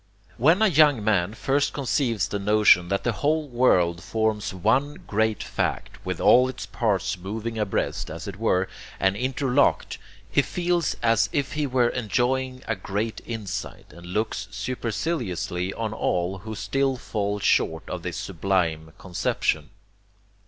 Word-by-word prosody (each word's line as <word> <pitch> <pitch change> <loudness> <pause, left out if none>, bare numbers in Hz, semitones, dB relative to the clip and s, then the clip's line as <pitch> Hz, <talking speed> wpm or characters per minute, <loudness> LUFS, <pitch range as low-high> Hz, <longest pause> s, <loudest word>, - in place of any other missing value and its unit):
When 165 - +4
a - - +6
young 150 - +4
man 105 -1 +1
first 135 +6 0
conceives 120 -6 0
the 100 - -3
notion 105 -3 +5
that 100 +2 -1
the 120 - +1
whole 150 +6 0
world 90 -10 +2
forms 110 -2 -1
one 120 +10 +1
great 110 -1 0
fact, - - -3
with - - -3
all 125 +1 +6
its 130 - -6
parts 100 -4 -1
moving 110 +4 -4
abreast, 105 -3 -1
as 80 +5 -7
it 100 -2 -6
were, 95 -4 +1 0.3
and 95 0 +2
interlocked, 130 +3 +1 0.3
he - - +3
feels 175 -2 0
as 115 -1 +3
if 135 -3 -1
he 150 -1 0
were 125 -2 +2
enjoying 130 +3 -1
a 115 - 0
great 100 +4 -3
insight, 110 -4 -6
and 85 0 -12
looks 100 +1 -2
superciliously 105 - -2
on 110 -2 -3
all 90 -2 -1
who 110 +3 -7
still 135 +6 0
fall 105 -3 -2
short 80 -4 +1
of 90 - -5
this 85 0 -4
sublime 80 -4 -1
conception. 80 -4 -1
110 Hz, 145 wpm, -25 LUFS, 95-130 Hz, 0.3 s, a